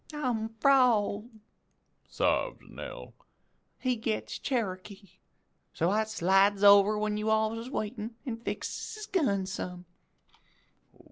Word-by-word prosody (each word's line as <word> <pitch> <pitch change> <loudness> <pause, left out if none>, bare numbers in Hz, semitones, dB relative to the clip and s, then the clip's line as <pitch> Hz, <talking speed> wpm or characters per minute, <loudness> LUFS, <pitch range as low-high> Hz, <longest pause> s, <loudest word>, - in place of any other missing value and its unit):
"'I'm 240 -6 -1
'frald,' 235 -5 +3 0.8
sobs - - 0
Nell, - - -9 0.6
'he 255 -1 0
gets 220 -1 -3
Cherokee; 200 -5 -4 0.6
so 170 +3 +1
I 215 +2 +2
slides 200 -1 +2
over 200 +1 +7
when 210 0 -1
you 215 +1 -1
alls 220 +1 +1
is 235 +2 -7
waitin' 225 -2 -4
an' 240 -4 -3
fixes 235 - -5
his 430 0 -7
gun 270 - 0
some.' 180 -2 -6
215 Hz, 115 wpm, -29 LUFS, 200-240 Hz, 0.8 s, over